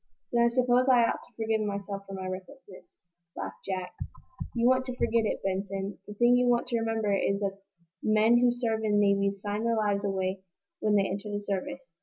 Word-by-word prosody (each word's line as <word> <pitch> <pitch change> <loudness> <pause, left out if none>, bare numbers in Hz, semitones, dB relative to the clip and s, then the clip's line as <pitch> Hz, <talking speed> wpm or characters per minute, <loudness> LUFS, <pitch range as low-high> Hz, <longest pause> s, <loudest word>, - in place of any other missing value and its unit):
"Then 235 0 +4
I - - +5
suppose 250 +1 +3
I 245 -2 +6
ought - - 0
to - - -18
forgive 220 -1 0
myself 200 -1 -4
for 195 - -8
my 190 -1 -5
recklessness," 190 +3 -9 0.4
laughed - - -7
Jack. 185 -2 -4 0.6
"You 235 0 +3
want 260 0 +4
to 255 -1 -5
forget 230 -2 +2
it, - - -3
Benson. 195 +1 -3
The 210 - -8
thing 240 +3 +5
you 250 0 +3
want 240 -1 +3
to 235 -2 +1
remember 225 -2 0
is 195 0 0
that 195 -1 -2 0.4
men 220 +2 +4
who 245 0 +4
serve 230 -2 -1
in 210 -1 +2
navies 200 -1 +2
sign 205 +1 -2
their 230 -1 +1
lives 205 -2 +1
away 190 -1 -1 0.4
when 210 -1 +2
they 200 -1 +4
enter 200 +3 -4
the 205 - -2
service. 205 +6 -5
210 Hz, 205 wpm, -28 LUFS, 195-235 Hz, 0.6 s, I